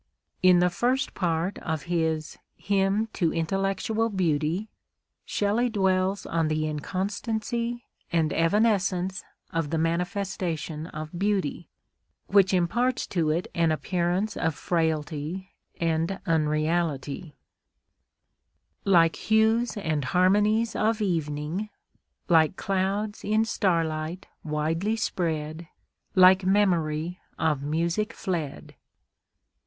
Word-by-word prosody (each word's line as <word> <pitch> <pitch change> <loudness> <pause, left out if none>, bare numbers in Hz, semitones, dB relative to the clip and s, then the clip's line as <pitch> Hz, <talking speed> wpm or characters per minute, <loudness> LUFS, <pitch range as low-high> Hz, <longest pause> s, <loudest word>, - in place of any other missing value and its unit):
In 185 -1 +6
the 180 0 +3
first 250 +8 0
part 170 +1 -1
of 160 -3 -3
his 160 -3 -1 0.2
"Hymn 200 +2 +1
to 170 -4 +1
Intellectual 195 +6 0
Beauty" 170 0 0 0.6
Shelley 215 +4 +1
dwells 190 -2 +1
on 165 -1 0
the 155 0 0
inconstancy 220 - -3 0.3
and 160 -3 +1
evanescence 190 0 +1 0.3
of 165 -3 -1
the 165 - -1
manifestation 170 -2 -2
of 155 +1 -7
beauty, 200 -6 -1 0.6
which 195 -1 +4
imparts 235 +8 +1
to 165 -4 0
it 170 +7 0
an 165 -1 +2
appearance 180 +5 -1
of 165 -2 -1
frailty 160 +2 -2 0.3
and 165 +3 0
unreality: 155 -2 0 1.5
Like 170 -4 +4
hues 220 +2 +2
and 160 -7 -1
harmonies 210 - +3
of 220 +1 +1
evening, 165 +1 -2 0.6
Like 160 -1 +4
clouds 195 +3 -1
in 215 +2 +2
starlight 165 -3 -1 0.2
widely 160 +7 -1
spread, 160 -6 -2 0.5
Like 185 0 +7
memory 175 -4 +1 0.2
of 150 -4 +1
music 170 +9 -1
fled. 165 -7 -4
180 Hz, 100 wpm, -26 LUFS, 160-200 Hz, 1.5 s, Like